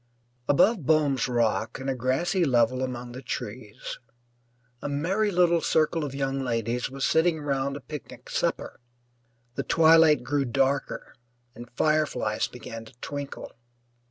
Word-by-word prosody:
Above 190 +6 +4
Boehm's 145 -4 +2
Rock, 115 -2 0
in 135 - -5
a 135 - +1
grassy 130 +9 0
level 125 -3 +2
among 125 -1 -4
the 125 +2 -8
trees, 110 -3 -6 0.8
a - - -3
merry 185 +10 0
little 175 -3 +3
circle 160 +1 +1
of 140 -2 -5
young 135 0 -1
ladies 120 -1 -1
was 135 +1 -2
sitting 160 0 +2
round 140 -1 -1
a - - -11
picnic 150 -1 -9
supper. - - -2 0.7
The - - -2
twilight 160 -4 +5
grew 140 +2 0
darker 135 +3 -1 0.4
and 120 0 -11
fireflies 150 -9 +1
began 115 -2 -9
to 110 - -15
twinkle. 140 +1 -6
135 Hz, 135 wpm, -26 LUFS, 125-155 Hz, 0.8 s, twilight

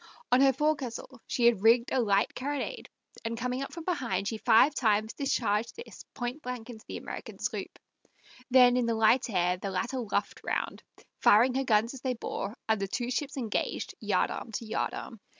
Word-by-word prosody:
On 250 +2 +5
her 275 0 +6
forecastle 265 -3 -2
she 240 - 0
had 235 -5 +4
rigged 235 +2 +4
a - - +3
light 200 -4 +2
carronade, 285 +2 -4 0.3
and 230 0 -3
coming 250 +2 -2
up 275 - -5
from 335 - -7
behind, 235 - -1
she 220 0 -3
five 255 +8 +5
times 220 -4 +1
discharged 230 -5 0
this 465 - -11
pointblank 250 -1 -5
into 220 -2 -12
the - - -5
American - - -8
sloop; - - -4 0.7
then 250 -1 +6
in 245 -2 +1
the 230 - +1
light 230 +4 +3
air 180 -3 +1
the 195 +2 -4
latter 230 +8 -2
luffed 225 -4 -2
round, - - -2 0.4
firing 240 +5 +5
her 270 +1 0
guns 225 -1 +2
as 265 - -9
they 255 -2 -1
bore, 215 0 -5
and 220 -2 +1
the 195 - -1
two 240 +5 -3
ships 275 +2 -2
engaged 230 -5 -2
yard - - +1
arm 230 - -6
to 230 - -4
yard 220 - -2
arm. 225 - -8
240 Hz, 190 wpm, -29 LUFS, 220-260 Hz, 0.7 s, her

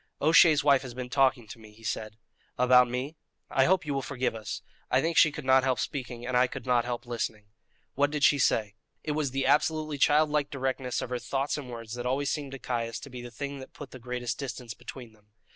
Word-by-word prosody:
"O'Shea's 160 -1 +6
wife 140 -2 +5
has 125 -3 -8
been 125 -1 -6
talking 130 -4 +2
to 115 - -10
me," 110 -1 -15
he 115 +1 -19
said. 110 -1 -4 0.4
"About 125 0 +5
me?" 130 +6 -4 0.3
"I 130 -1 +4
hope 185 -1 +2
you 145 - -2
will 135 - -1
forgive 130 -2 -2
us. 110 -3 -6 0.3
I 130 - +3
think 165 +4 0
she 155 - +6
could 150 -1 -7
not 130 0 +5
help 130 -1 +1
speaking, 125 -3 -4
and 125 0 -2
I 125 +1 +5
could 130 -1 -8
not 120 -2 +2
help 120 0 -4
listening." 110 -3 -4 0.4
"What 145 +1 +2
did 150 -1 -3
she 145 - +5
say?" 110 -4 +2 0.3
It 155 - -2
was 150 -2 0
the 135 +1 -1
absolutely 155 +1 +1
childlike 150 0 +3
directness 130 -2 -2
of 125 - -7
her 125 - -1
thoughts 135 +3 -2
and 140 -4 -6
words 115 -2 -7
that 120 0 -4
always 140 +2 0
seemed 145 -3 -4
to - - -5
Caius 115 -3 -3
to 140 - -10
be 125 -1 -7
the 120 - -8
thing 140 +4 -6
that 130 - -11
put 140 -3 -10
the 130 - -10
greatest 125 -1 -4
distance 125 -4 -5
between 120 -1 -10
them. 105 -1 -26
130 Hz, 235 wpm, -28 LUFS, 120-140 Hz, 0.4 s, O'Shea's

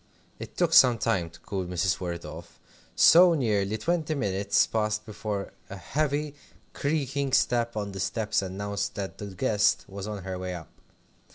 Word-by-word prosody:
It - - -9
took - - +1
some 125 -3 +7
time 90 -5 0
to 80 - -17
cool 95 -2 -4
Mrs. 90 0 0
Worrett 85 -2 -5
off, - - -10 0.4
so 175 0 +7
nearly 105 -6 0
twenty 160 +4 -1
minutes 100 -5 +1
passed 110 -1 -1
before 105 -2 -5 0.2
a 95 - -7
heavy, 145 - -2 0.4
creaking 140 -2 -1
step 120 -3 +2
on 100 -1 -3
the 95 - -7
stairs 105 +4 0
announced 100 +2 -4
that 100 -1 -5
the 105 - -5
guest 105 +1 +1
was 100 +1 -7
on 105 -3 -5
her 95 -1 -5
way 90 -1 -4
up. 80 -5 -10
105 Hz, 165 wpm, -27 LUFS, 95-125 Hz, 0.4 s, some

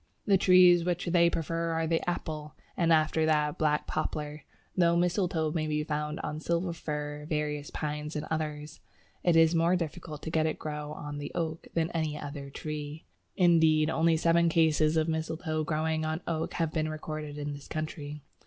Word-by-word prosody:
The 200 - +5
trees 180 -2 +6
which 175 0 -1
they 170 -1 +4
prefer 165 0 -2
are 165 0 0
the 165 0 +1
Apple, 155 -3 -4 0.2
and 170 -2 +2
after 155 0 +3
that 150 -1 +1
Black 150 -1 +2
Poplar, 150 -1 -3 0.3
though 170 -2 +4
mistletoe 170 -3 +1
may 155 -1 -1
be 150 0 0
found 150 0 -3
on 150 - -4
Silver 170 +2 -1
Fir, 150 -2 -5
various 150 -1 -2
Pines, 150 0 -4
and 150 - -2
others. 150 -1 -3 0.4
It 175 -2 +4
is 165 0 +6
more 170 +2 +3
difficult 155 -2 -5
to 160 - -4
get 160 -1 +2
it 155 - 0
to - - -15
grow 150 -1 -5
on 145 -1 -6
the 145 - -5
Oak 165 -1 -3
than 165 -1 +1
on - - -11
any 155 -2 -1
other 140 -1 -6
tree. 150 +1 -6 0.3
Indeed, 160 -3 +4
only 165 0 +3
seven 170 +1 +3
cases 160 -1 +3
of 160 0 +2
mistletoe 160 0 -2
growing 155 +1 0
on 155 +2 -2
oak 160 -1 -2
have 165 -2 -1
been 155 -1 0
recorded 155 -1 -5
in 145 0 -3
this 145 0 -10
country. 150 -2 -5
155 Hz, 185 wpm, -29 LUFS, 150-165 Hz, 0.4 s, trees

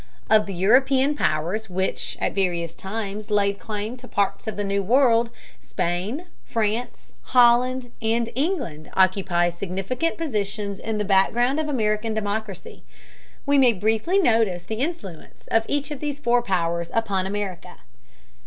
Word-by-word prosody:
Of 215 -1 +5
the 195 - -4
European 260 +9 +4
powers 185 - -1
which 190 +1 -2
at - - -1
various 175 -4 -1
times 205 +2 -5
laid 200 -1 +1
claim 215 +2 -5
to 250 0 -12
parts 200 +1 -1
of 220 - -3
the 205 - -1
New 200 0 0
World, 235 +1 +3 0.3
Spain, 185 - -3 0.2
France, 225 +2 -3 0.2
Holland, 245 +1 +4
and 230 +1 0
England 265 - -2
occupy 185 -2 +2
significant 195 - -3
positions 205 -8 -3
in 220 -1 -3
the 210 - -1
background 240 +8 +3
of 310 -1 -2
American 220 -4 0
democracy. 210 -1 -4 0.6
We 285 -1 +4
may 250 -3 +5
briefly 220 - +1
notice 225 - +2
the 220 +4 -5
influence 265 - -6
of 225 0 +3
each 290 +1 -1
of 290 - -5
these 290 -1 -3
four 245 -3 +2
powers 170 -5 -1
upon 200 -5 0
America. 195 -3 -5
215 Hz, 145 wpm, -23 LUFS, 195-245 Hz, 0.6 s, Of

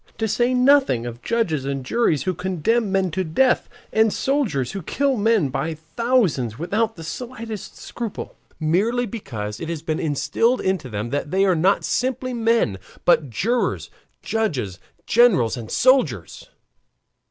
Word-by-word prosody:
To 220 - 0
say 240 +4 +1
nothing 255 - +4
of 120 0 -7
judges 185 - 0
and 135 -1 -3
juries 155 - +1
who 185 - 0
condemn 190 +5 0
men 190 -2 +1
to 190 +4 -1
death, 250 +11 +2 0.2
and 220 0 +4
soldiers 230 - 0
who 195 - -5
kill 275 - 0
men 215 - +2
by 155 +5 -2
thousands 160 - 0
without 215 - -1
the 165 - -9
slightest 230 +3 -7
scruple 230 -4 -6 0.2
merely 205 +10 +1
because 110 - -6
it 165 - -5
has 165 -2 -4
been 160 -1 -2
instilled 225 - +1
into 190 -8 -1
them 105 +1 -4
that 145 +1 -2
they 190 +4 +2
are 190 - +4
not 185 +5 +2
simply 255 0 -1
men, 225 - +1 0.3
but 155 -5 +4
jurors, 230 - -1 0.3
judges, 140 - -2 0.3
generals, 195 - +4
and 115 -3 -7
soldiers. 175 - +1
190 Hz, 150 wpm, -22 LUFS, 145-235 Hz, 0.3 s, nothing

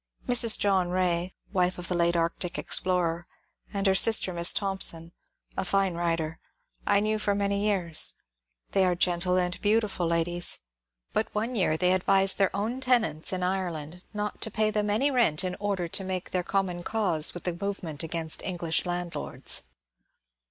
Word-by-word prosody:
Mrs. 240 -3 +5
John 190 -3 +1
Rae 180 -1 0 0.2
(wife 180 -1 +1
of 175 -1 -2
the - - -1
late 170 0 +2
Arctic 170 +1 -1
explorer) 175 -2 0 0.4
and 200 -1 -3
her 190 - +4
sister. 190 -2 +3
Miss 170 0 +3
Thompson, 190 -5 0 0.4
a 190 - -1
fine 195 0 +1
writer, 165 -2 -2 0.5
I 205 -1 +4
knew 215 +1 0
for 205 -1 0
many 200 0 0
years. 180 -6 +1 0.6
They 195 - +3
are 180 -1 +2
genUe 180 +1 +1
and 180 0 -2
beautiful 205 -4 +1
ladies; 170 +1 +2 0.6
but 220 - +1
one 225 +4 -1
year 170 -7 +1
they 180 +2 +2
advised 195 +1 +3
their 195 - +4
own 220 +6 -2
tenants 225 - +1
in 185 -1 -2
Ireland 180 -3 -3
not 210 -1 -4
to - - -1
pay 215 0 +1
them 210 0 0
any 250 +8 +2
rent 215 - +2
in 180 -1 -3
order 200 -4 -2
to 195 - +1
make 185 -1 -4
com 195 -1 +1
mon 175 -1 -5
cause 175 -7 +1
with 175 - -7
the 180 - -2
movement 175 -5 -5
against 165 -1 -1
English 175 -2 -1
landlords. 175 -1 0
185 Hz, 165 wpm, -27 LUFS, 170-200 Hz, 0.6 s, Mrs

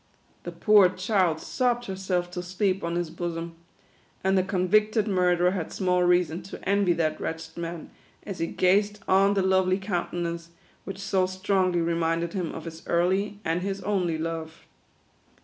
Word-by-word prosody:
The - - -4
poor 210 -4 +5
child 185 -3 +1
sobbed 245 +2 0
herself 185 -3 -2
to 180 - -4
sleep 185 +1 -1
on 170 0 -2
his 175 -2 -2
bosom; 170 0 -4 0.7
and 190 0 +2
the 190 - +4
convicted 210 +4 +2
murderer 180 -2 +3
had 185 -4 -4
small 180 -2 +1
reason 175 -1 +2
to 185 +2 -10
envy 200 -2 +3
that 160 -2 -1
wretched 160 0 -5
man, 170 -1 -6 0.3
as 195 -3 -7
he 165 - 0
gazed 200 +4 +2
on 195 +2 +4
the 195 - +2
lovely 190 0 +3
countenance, 175 -3 -3 0.4
which 195 - -6
so 195 -2 +1
strongly 185 -2 +1
remind 165 0 0
ed 170 - -4
him 180 -5 -2
of - - -8
his 165 0 -8
early 190 +4 +1
and 165 +2 0
his 195 +1 -3
only 180 -6 0
love. 160 0 -5
180 Hz, 165 wpm, -26 LUFS, 170-195 Hz, 0.7 s, poor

